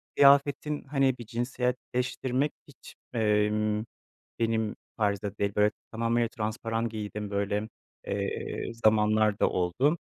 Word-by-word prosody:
kıyafetin 140 +1 +4
hani 135 -2 +1
bir 120 - -8
cinsiyetleştirmek 125 +3 -1 0.2
hiç, 140 - -14 0.2
emm, 105 -1 +2 0.6
benim 110 -2 0 0.2
tarzda 100 -1 -1
değil 100 0 0
böyle 105 0 +4 0.2
tamamıyla 115 +1 +1
transparan 115 +1 -2
giydiğim 105 -1 -5
böyle, 100 +1 -1 0.4
eee, 100 +3 -3
zamanlarda 110 -1 +3
oldu. 125 - +1
110 Hz, 100 wpm, -28 LUFS, 105-125 Hz, 0.6 s, kıyafetin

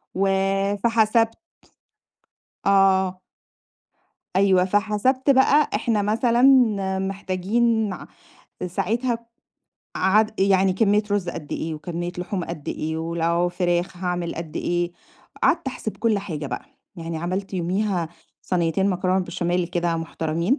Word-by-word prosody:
وفحسبت 200 +4 +2 1.3
آه. 190 -2 +3 1.2
أيوه، 190 -2 +4
فحسبت 215 +7 +1
بقى 280 +2 +5
إحنا 215 0 +1
مثلًا 230 +4 +2 0.6
محتاجين 200 +4 0
مع 185 - -7 0.6
ساعتها 230 +7 -1 0.8
عاد 215 +3 +2
يعني 195 -1 +4
كميّة 205 +2 +3
رُز 200 -4 0
قد 150 -3 -6
إيه، 160 0 -3
وكميّة 175 +2 -5
لحوم 180 0 -3
قد 155 -4 -7
إيه، 160 +1 -3
ولو 170 +1 0
فراخ 175 0 -1
هاعمل 175 -1 -2
قد 165 -1 -6
إيه. 175 0 -1 0.5
قعدت 335 -3 +2
احسب 220 -4 -5
كل 225 -3 +1
حاجة 155 -7 -5
بقى. 125 -2 -5 0.3
يعني 165 -1 -5
عملت 185 +4 -3
يوميها 180 0 -1 0.3
صنيتين 180 +2 +1
مكرونة 185 0 0
بشاميل 175 0 -1
كده، 170 -1 -1
مُحترمين 165 - -1
190 Hz, 110 wpm, -23 LUFS, 175-210 Hz, 1.3 s, بقى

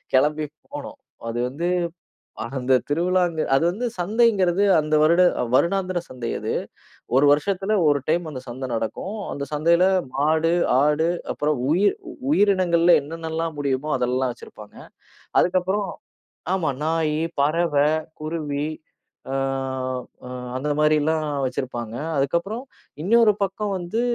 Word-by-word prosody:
கிளம்பி 150 +3 +2 0.3
போனோம். - - -7 0.3
அது 120 +1 -3
வந்து 165 +6 -3 0.9
அந்த 130 0 0 0.2
திருவிழா, 180 +5 +2
அங்க 160 -2 -3
அது 135 +5 +3
வந்து 220 +7 -4
சந்தைங்கிறது 200 -1 +2 0.2
அந்த 155 0 -1
வருட 170 +3 +5 0.3
வருடாந்திர 185 +3 +2
சந்தை 125 -2 -5
அது. - - -2 0.6
1 140 - +5
வருஷத்துல 195 +7 0
1 145 -1 +3
டைம் 165 +1 +1
அந்தச் 130 -2 -8
சந்தை 130 +2 -5
நடக்கும். 150 - -3 0.2
அந்தச் 140 +1 -6
சந்தையில 170 +4 +3 0.3
மாடு, 155 +4 +2 0.3
ஆடு 150 +2 +2 0.2
அப்புறம் 150 -1 -1
உயிர் 200 - +3 0.4
உயிரினங்கள்ல 185 - +4
என்னென்னலாம் 160 +1 -4
முடியுமோ 140 +1 -1
அதெல்லாம் 125 +1 0
வச்சிருப்பாங்க. 105 -3 -13 0.6
அதுக்கப்புறம் 185 +3 +1 0.7
ஆமா. 175 -6 0
நாயி, 160 -1 0 0.2
பறவை, 150 -1 +2 0.3
குருவி 155 -2 -3 0.7
அ, - - -1 0.9
அ, - - -8 0.3
அந்த 135 +3 -3
மாதிரி 150 0 +4
எல்லாம் 155 +1 0 0.2
வச்சிருப்பாங்க. 120 -3 -4 0.2
அதுக்கப்புறம் 170 - -1 0.4
இன்னொரு 225 +4 +5
பக்கம் 200 +2 -2
வந்து 180 +7 -2
160 Hz, 120 wpm, -23 LUFS, 145-180 Hz, 0.9 s, வருட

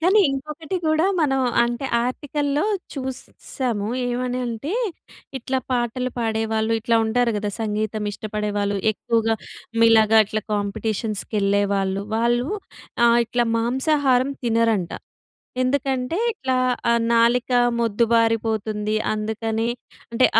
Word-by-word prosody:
కానీ 380 +5 +5
ఇంకొకటి 305 +5 -4
కూడా 315 +1 +3 0.2
మనం 270 -3 +2 0.2
అంటే 240 +3 -3 0.2
ఆర్టికల్‌లో 290 +4 -1 0.3
చూసాము. 255 -4 -4 0.2
ఏమని 250 +1 -2
అంటే 235 +8 -4 0.7
ఇట్లా 260 +2 -1
పాటలు 250 +1 -1
పాడేవాళ్ళు, 220 -1 0
ఇట్లా 230 0 +2
ఉంటారు 235 +1 +1
కదా! 210 0 -2
సంగీతమిష్టపడేవాళ్ళు. 210 -1 -2 0.2
ఎక్కువగా 225 +1 0 0.5
మీలాగా 225 -1 +6
ఇట్లా 215 +1 -3
కాంపిటీషన్స్‌కెళ్ళేవాళ్ళు. 200 -1 -1
వాళ్ళు 240 +3 +1 0.6
ఆహ్, 235 0 +5
ఇట్లా 240 +1 +1
మాంసాహారం 265 +2 +2
తినరంట. 225 -6 +1 0.7
ఎందుకంటే 265 +2 0 0.2
ఇట్లా 265 -11 -2 0.3
ఆహ్, 235 0 +3
నాలిక 235 +2 +3 0.3
మొద్దుబారిపోతుంది. 225 -1 +1 0.2
అందుకని 220 +1 -2 0.4
అంటే 245 +2 +5
230 Hz, 95 wpm, -22 LUFS, 215-255 Hz, 0.7 s, మీలాగా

